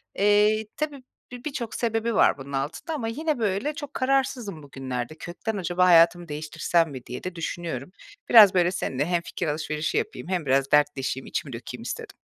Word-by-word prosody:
eee, 210 Hz, +2 st, +3 dB
tabii, 290 Hz, -3 st, -3 dB, 0.3 s
bi 245 Hz, -1 st, -9 dB
birçok 270 Hz, -7 st, -4 dB
sebebi 225 Hz, -1 st, -1 dB
var -, -, +4 dB
bunun 140 Hz, 0 st, -9 dB
altında 140 Hz, -, -3 dB
ama 255 Hz, -7 st, -3 dB
yine, 300 Hz, +4 st, -1 dB
böyle, 215 Hz, +7 st, 0 dB
çok 290 Hz, -1 st, -8 dB
kararsızım 255 Hz, -, 0 dB
bugünlerde. 130 Hz, -1 st, -5 dB
“Kökten 205 Hz, +5 st, -5 dB
acaba 180 Hz, -1 st, +1 dB
hayatımı 175 Hz, 0 st, +5 dB
değiştirsem 155 Hz, +2 st, 0 dB
mi?” 130 Hz, -2 st, -8 dB
diye 125 Hz, -, -7 dB
de 185 Hz, -1 st, -5 dB
düşünüyorum. 165 Hz, -4 st, -4 dB, 0.4 s
Biraz, 215 Hz, -5 st, +9 dB
böyle, 175 Hz, -1 st, +3 dB
seninle 145 Hz, -6 st, -2 dB
hem 175 Hz, 0 st, 0 dB
fikir 170 Hz, 0 st, -4 dB
alışverişi 155 Hz, +1 st, -2 dB
yapayım -, -, -3 dB
hem 180 Hz, -4 st, -1 dB
biraz 135 Hz, 0 st, +2 dB
dertleşeyim 145 Hz, -3 st, +1 dB
içimi 140 Hz, -5 st, -4 dB
dökeyim 115 Hz, 0 st, -7 dB
istedim. -, -, -6 dB
175 Hz, 170 wpm, -25 LUFS, 150-225 Hz, 0.4 s, Biraz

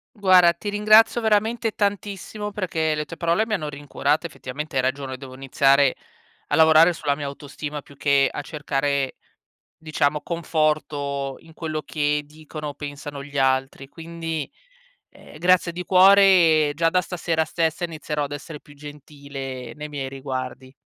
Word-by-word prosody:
Guarda, 185 Hz, -4 st, +5 dB
ti 170 Hz, +5 st, -7 dB
ringrazio 215 Hz, +3 st, +5 dB
veramente 220 Hz, +1 st, +1 dB
tantissimo 205 Hz, 0 st, -3 dB
perché 165 Hz, -6 st, -1 dB
le 150 Hz, 0 st, -3 dB
tue 165 Hz, -, -9 dB
parole 170 Hz, +6 st, +1 dB
mi 220 Hz, -, -1 dB
hanno 155 Hz, -7 st, -3 dB
rincuorato. 145 Hz, +2 st, -1 dB
Effettivamente 150 Hz, -1 st, -7 dB
hai 130 Hz, -, +3 dB
ragione, 130 Hz, 0 st, -2 dB
devo 130 Hz, 0 st, -11 dB
iniziare 135 Hz, +1 st, +3 dB, 0.5 s
a -, -, +1 dB
lavorare 160 Hz, +2 st, +6 dB
sulla 145 Hz, -3 st, -1 dB
mia 145 Hz, -1 st, -5 dB
autostima, 145 Hz, +1 st, -7 dB
più 140 Hz, -, -18 dB
che 140 Hz, -1 st, +3 dB
a 145 Hz, -, -5 dB
cercare, 140 Hz, -2 st, -2 dB, 0.6 s
diciamo, 150 Hz, -1 st, -1 dB
conforto 150 Hz, -4 st, -1 dB
in 160 Hz, -, -17 dB
quello 155 Hz, -1 st, -4 dB
che 150 Hz, -1 st, -1 dB
dicono 150 Hz, 0 st, -8 dB
o 145 Hz, -, -7 dB
pensano 145 Hz, -1 st, -7 dB
gli 145 Hz, 0 st, -8 dB
altri. 135 Hz, 0 st, 0 dB
Quindi, 165 Hz, -2 st, -6 dB, 0.6 s
ehm, -, -, -15 dB
grazie 175 Hz, +1 st, +3 dB
di 180 Hz, +1 st, -6 dB
cuore. 185 Hz, -5 st, +6 dB
Già 165 Hz, +2 st, +2 dB
da 180 Hz, +2 st, +2 dB
stasera 165 Hz, -3 st, -1 dB
stessa 165 Hz, +1 st, -1 dB
inizierò 150 Hz, -3 st, -4 dB
ad 140 Hz, -, -5 dB
essere 150 Hz, +1 st, -7 dB
più 145 Hz, -, -17 dB
gentile 140 Hz, -3 st, -8 dB
nei 150 Hz, 0 st, -7 dB
miei 140 Hz, -2 st, -5 dB
riguardi. 130 Hz, -1 st, -6 dB
150 Hz, 150 wpm, -23 LUFS, 140-170 Hz, 0.6 s, lavorare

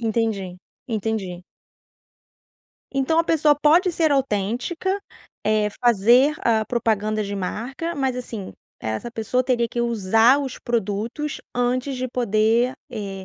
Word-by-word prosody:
Entendi, 220 Hz, -5 st, -1 dB, 0.3 s
entendi. 210 Hz, -5 st, -3 dB, 1.5 s
Então 275 Hz, +4 st, +2 dB
a 335 Hz, -, +4 dB
pessoa 305 Hz, -3 st, +3 dB
pode 340 Hz, +6 st, +5 dB
ser 320 Hz, -3 st, +2 dB
autêntica, 270 Hz, -, -1 dB, 0.5 s
eh, 215 Hz, -1 st, +2 dB
fazer 240 Hz, +5 st, +5 dB
a 220 Hz, -2 st, +3 dB
propaganda 215 Hz, -2 st, 0 dB
de 200 Hz, 0 st, -4 dB
marca, 245 Hz, -, -4 dB
mas 265 Hz, -4 st, 0 dB
assim, 225 Hz, -6 st, -6 dB, 0.3 s
essa 110 Hz, -, -4 dB
pessoa 230 Hz, +2 st, 0 dB
teria 245 Hz, -2 st, +1 dB
que 240 Hz, -, -3 dB
usar 230 Hz, +2 st, +4 dB
os 270 Hz, -3 st, -4 dB
produtos 235 Hz, +5 st, -2 dB, 0.2 s
antes 250 Hz, +2 st, 0 dB
de 255 Hz, 0 st, -2 dB
poder, 235 Hz, +1 st, +2 dB, 0.2 s
eh, 195 Hz, -2 st, -6 dB
235 Hz, 120 wpm, -23 LUFS, 215-265 Hz, 1.5 s, pode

